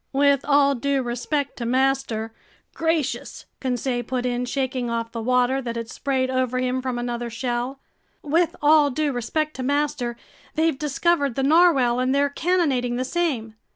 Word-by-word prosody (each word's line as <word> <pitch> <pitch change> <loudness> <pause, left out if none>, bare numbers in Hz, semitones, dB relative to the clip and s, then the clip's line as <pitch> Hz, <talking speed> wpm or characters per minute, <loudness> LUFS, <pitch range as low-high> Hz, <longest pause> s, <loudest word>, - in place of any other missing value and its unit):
"With 280 0 +3
all 280 -1 +4
due 275 +1 0
respect 270 +4 -2
to 235 - -4
master—gracious!" 270 +4 -2
Conseil 250 -1 -1
put 250 0 -3
in, 245 0 -1
shaking 255 -1 -2
off 230 0 -2
the 230 - -4
water 250 +2 +2
that 235 -2 -4
had 230 0 -5
sprayed 260 -2 -1
over 255 -1 0
him 255 0 0
from 255 -1 -3
another 240 0 -3
shell. 245 +3 -3 0.4
"With 325 +3 +1
all 300 -1 +6
due 295 +2 0
respect 305 +5 -2
to - - -4
master, 265 -3 -1 0.4
they've 320 -3 +1
discovered 295 -2 +1
the 270 - 0
narwhale 275 -6 +4
and 255 +1 +1
they're 285 0 +2
cannonading 285 -8 +1
the 255 +1 -1
same." 265 -9 -1
260 Hz, 155 wpm, -23 LUFS, 245-285 Hz, 0.4 s, all